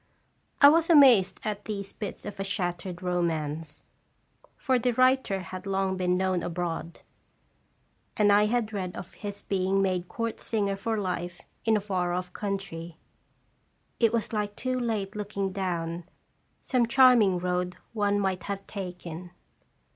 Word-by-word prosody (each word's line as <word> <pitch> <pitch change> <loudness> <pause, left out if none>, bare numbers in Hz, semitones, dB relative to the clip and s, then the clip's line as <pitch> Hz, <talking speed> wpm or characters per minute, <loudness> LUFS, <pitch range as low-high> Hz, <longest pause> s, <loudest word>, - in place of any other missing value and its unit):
I 285 - +11
was 330 +2 +3
amazed 265 - +6
at 210 -1 -3
these 200 -2 -5
bits 210 - -6
of 205 -1 -7
a - - 0
shattered 180 -2 -3
romance; 160 -3 -2 0.7
for 260 -2 +1
the 245 0 +1
writer 255 -5 +3
had 185 +1 -8
long 195 -1 0
been 180 -1 +1
known 185 -1 +1
abroad, 170 -1 -4 1.2
and 205 -1 +5
I 205 +1 +5
had 225 -1 0
read 185 -3 -3
of 185 - -8
his 205 -1 -7
being 190 0 +1
made 185 -2 0
court 230 +3 -3
singer 200 -3 -1
for 220 +3 -2
life 180 -3 -3 0.3
in 220 -1 +4
a - - -2
far 185 -3 -1
off 180 0 -3
country. 190 -5 -5 1.0
It 230 -2 +4
was 230 -1 -2
like 205 -1 -2
too 255 0 -2
late 215 -4 -2
looking 200 -2 -3
down 170 -3 -3 0.5
some 250 -3 +1
charming 235 -7 +6
road 180 0 -2 0.2
one 205 -2 +1
might 190 -2 0
have 195 -1 -4
taken. 180 -3 -7
195 Hz, 145 wpm, -28 LUFS, 180-215 Hz, 1.2 s, I